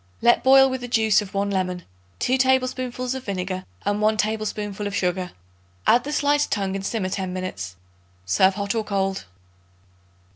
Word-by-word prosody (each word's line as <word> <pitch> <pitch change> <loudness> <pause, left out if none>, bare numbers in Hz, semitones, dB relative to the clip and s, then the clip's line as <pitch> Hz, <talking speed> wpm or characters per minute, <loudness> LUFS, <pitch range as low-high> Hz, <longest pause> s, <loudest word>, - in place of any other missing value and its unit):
Let 240 - +4
boil 270 0 +7
with 260 -1 -3
the 245 - -5
juice 220 -3 +3
of 200 -1 -9
1 200 +1 0
lemon, 180 -2 -2 0.3
2 255 - +1
tablespoonfuls 255 -1 0
of 265 -1 -6
vinegar 185 -1 -3 0.2
and 205 +1 0
1 215 +1 +3
tablespoonful 210 -1 -2
of 200 - -4
sugar. 180 -1 -1 0.6
Add 245 +3 +4
the 295 - -4
sliced 290 0 +1
tongue 195 -2 -1
and 195 - -4
simmer 195 -2 -2
ten 185 -1 -3
minutes. 95 - -5 0.5
Serve 190 - +3
hot 200 0 -2
or 225 -1 -1
cold. 195 - -2
205 Hz, 170 wpm, -23 LUFS, 190-245 Hz, 0.6 s, boil